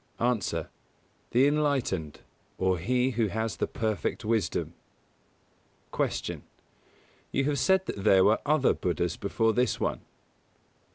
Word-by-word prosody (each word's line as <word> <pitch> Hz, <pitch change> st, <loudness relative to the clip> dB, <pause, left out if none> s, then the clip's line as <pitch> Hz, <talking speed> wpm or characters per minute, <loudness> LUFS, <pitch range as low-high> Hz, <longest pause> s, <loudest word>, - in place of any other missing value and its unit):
_ 120 Hz, -7 st, 0 dB
A. 80 Hz, -, -5 dB, 0.6 s
The 125 Hz, +3 st, +4 dB
enlightened, 140 Hz, -, 0 dB, 0.4 s
or 95 Hz, -1 st, +1 dB
he 125 Hz, +7 st, +1 dB
who 115 Hz, -2 st, +1 dB
has 110 Hz, +1 st, -3 dB
the -, -, -1 dB
perfect 110 Hz, +1 st, -2 dB
wisdom. 110 Hz, -1 st, -1 dB, 1.2 s
107. -, -, -2 dB, 0.9 s
Q. 135 Hz, -, +1 dB
_You -, -, -1 dB
have 145 Hz, -2 st, 0 dB
said 190 Hz, +5 st, +3 dB
that 100 Hz, -, -5 dB
there 95 Hz, -2 st, +6 dB
were 110 Hz, +2 st, +4 dB
other 150 Hz, -2 st, +3 dB
Buddhas 85 Hz, -1 st, -1 dB
before 110 Hz, +3 st, 0 dB
this 125 Hz, +3 st, +1 dB
one? -, -, -1 dB
115 Hz, 130 wpm, -28 LUFS, 95-130 Hz, 1.2 s, there